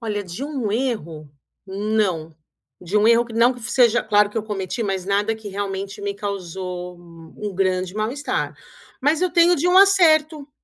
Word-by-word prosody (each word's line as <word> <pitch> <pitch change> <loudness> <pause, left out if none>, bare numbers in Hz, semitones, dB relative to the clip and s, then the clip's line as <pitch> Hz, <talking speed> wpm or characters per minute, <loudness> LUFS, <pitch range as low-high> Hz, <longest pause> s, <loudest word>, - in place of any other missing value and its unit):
Olha 210 -3 -3
de 180 +8 -7
um 270 -8 -3
erro, 170 - -3 0.4
não, 190 -5 -1 0.5
de 180 +3 -3
um 210 +1 +4
erro 235 +1 +5
que 230 - -11
não 235 +3 +4
que 245 - -12
seja 240 0 +2
claro 210 -1 +3
que 225 - -3
eu 215 - -3
cometi, 205 +1 -4
mas 195 -3 -2
nada 205 +3 0
que 220 -2 -9
realmente 195 +1 -5
me 200 0 -3
causou 180 -3 -6
um 170 +4 -9
grande 185 -1 -1
mal-estar, 230 +7 -3 0.4
mas 300 +4 +2
eu 365 - +1
tenho 345 +1 +5
de 345 +4 0
um 365 - +3
acerto. 315 -7 +4
210 Hz, 175 wpm, -21 LUFS, 190-245 Hz, 0.5 s, erro